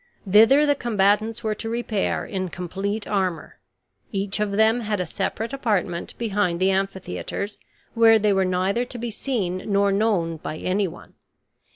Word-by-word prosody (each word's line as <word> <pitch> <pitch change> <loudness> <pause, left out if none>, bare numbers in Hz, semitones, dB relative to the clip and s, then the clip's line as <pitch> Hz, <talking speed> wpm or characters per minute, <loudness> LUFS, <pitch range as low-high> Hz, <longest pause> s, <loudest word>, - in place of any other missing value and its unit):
Thither 225 +9 +6
the 290 - +4
combatants 220 -2 +1
were 215 -1 0
to 225 +1 -5
repair 230 -3 -1
in 185 -2 -3
complete 195 +5 -4
armor. 185 -5 -2 0.5
Each 195 0 -2
of 210 -1 -1
them 220 +3 +4
had 210 -3 -2
a 180 - -1
separate 225 +7 -3
apartment 205 -10 -1
behind 205 -6 0
the 190 +1 +3
amphitheaters, 195 - -3 0.3
where 225 -1 +6
they 210 -1 +2
were 195 0 +2
neither 185 +5 0
to 250 0 -8
be 235 0 -4
seen 205 -7 -2
nor 200 0 +3
known 195 -6 +1
by 155 - -6
anyone. 185 - -3
205 Hz, 155 wpm, -23 LUFS, 185-225 Hz, 0.5 s, Thither